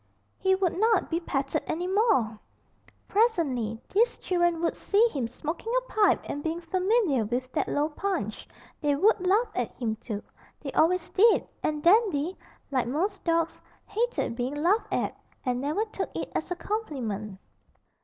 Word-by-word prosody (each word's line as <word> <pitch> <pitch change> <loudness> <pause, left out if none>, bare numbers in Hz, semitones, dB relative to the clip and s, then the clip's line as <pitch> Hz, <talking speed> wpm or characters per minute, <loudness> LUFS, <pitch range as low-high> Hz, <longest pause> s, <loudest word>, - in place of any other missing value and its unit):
He 380 0 +3
would 375 -3 +1
not 435 0 +2
be 330 - +1
petted 295 -2 -1
any 345 +3 -2
more! 370 - +2 0.7
Presently 285 - +1
these 465 +5 +3
children 345 -2 +1
would 335 - +1
see 425 +4 +3
him 265 - -2
smoking 315 - -5
a - - -3
pipe 425 -2 +4
and 290 - -4
being 325 +1 -2
familiar 365 - +1
with 250 +4 -3
that - - 0
low 290 +1 +1
Punch. 320 - -3 0.3
They 290 -2 +2
would 380 +3 +3
laugh 430 +5 +3
at 245 -2 -1
him 220 -3 -2
too 215 -3 -5 0.4
they 280 - -6
always 335 +4 +2
did 440 +4 +4
and 300 -1 -1
Dandy, 365 -4 +3 0.4
like 255 -3 +1
most 370 - -1
dogs, 335 -1 0 0.2
hated 460 - -1
being 250 +3 -2
laughed 355 +9 +1
at, - - -1 0.3
and 250 -1 0
never 305 +10 0
took 410 -3 -4
it - - -4
as 315 - -2
a 360 - -1
compliment. 240 - -4
335 Hz, 160 wpm, -27 LUFS, 265-400 Hz, 0.7 s, pipe